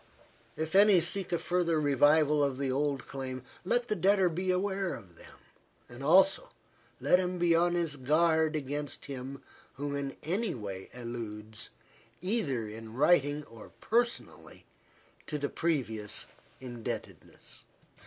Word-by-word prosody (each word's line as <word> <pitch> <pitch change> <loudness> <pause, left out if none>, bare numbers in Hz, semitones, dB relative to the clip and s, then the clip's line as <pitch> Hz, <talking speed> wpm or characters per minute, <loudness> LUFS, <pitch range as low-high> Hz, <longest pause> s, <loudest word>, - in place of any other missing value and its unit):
If 160 +1 -4
any 200 -1 +7
seek 180 +3 +1
a 170 - +2
further 170 -2 +1
revival 145 +1 +4
of 140 -2 0
the 135 -1 -1
old 140 -1 -1
claim, 130 -2 -5 0.2
let 240 +6 +1
the 215 - 0
debtor 195 -2 +3
be 180 +3 -3
aware 190 -2 0
of 95 -8 -13
them; - - -14 0.5
and 120 +1 -11
also, 185 +6 +4 0.5
let 180 - +4
him 180 0 -1
be 175 -1 +3
on 175 +1 +3
his 165 -4 -1
guard 160 +3 +2
against 145 0 -3
him 135 0 -7 0.3
who 145 +2 -4
in 140 -1 -4
any 190 +5 -1
way 100 -4 -6
alludes, 110 -3 -6 0.5
either 170 - -1
in 110 +1 -9
writing 145 0 +3
or 115 -5 -13
personally, 240 +1 -1 0.6
to 150 - -3
the 145 -1 -2
previous 115 -11 -1 0.3
indebtedness. 120 -3 -7
150 Hz, 135 wpm, -30 LUFS, 130-175 Hz, 0.6 s, any